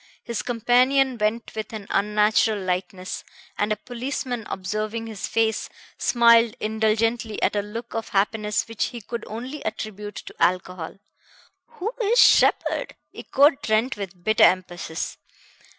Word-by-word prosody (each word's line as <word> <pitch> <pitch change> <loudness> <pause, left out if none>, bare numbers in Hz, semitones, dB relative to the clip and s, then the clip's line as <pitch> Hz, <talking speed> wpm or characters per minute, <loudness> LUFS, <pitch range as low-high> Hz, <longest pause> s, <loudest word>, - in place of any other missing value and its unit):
His 235 -2 -3
companion 250 +3 +3
went 215 +2 -1
with 220 -1 -5
an 215 -2 -6
unnatural 210 +1 +2
lightness, 185 0 -3 0.3
and 210 +1 0
a - - +3
policeman 245 0 -4
observing 215 +4 -3
his 220 -3 -5
face, 225 -1 0 0.3
smiled 235 -2 +5
indulgently 220 +1 0
at - - +2
a 205 - +2
look 230 +4 -7
of 225 0 -4
happiness 210 +1 0
which 225 -2 -1
he 240 - -6
could 230 +2 -6
only 250 +7 -6
attribute 210 -1 -5
to - - -8
alcohol. 180 -2 0 0.8
"Who 445 +1 -4
is 450 +2 +2
Sheppard?" - - +4 0.2
echoed 280 +1 +3
Trent 220 +4 +1
with 190 -3 -8
bitter 215 +2 +3
emphasis. 175 -3 +1
220 Hz, 135 wpm, -24 LUFS, 205-235 Hz, 0.8 s, smiled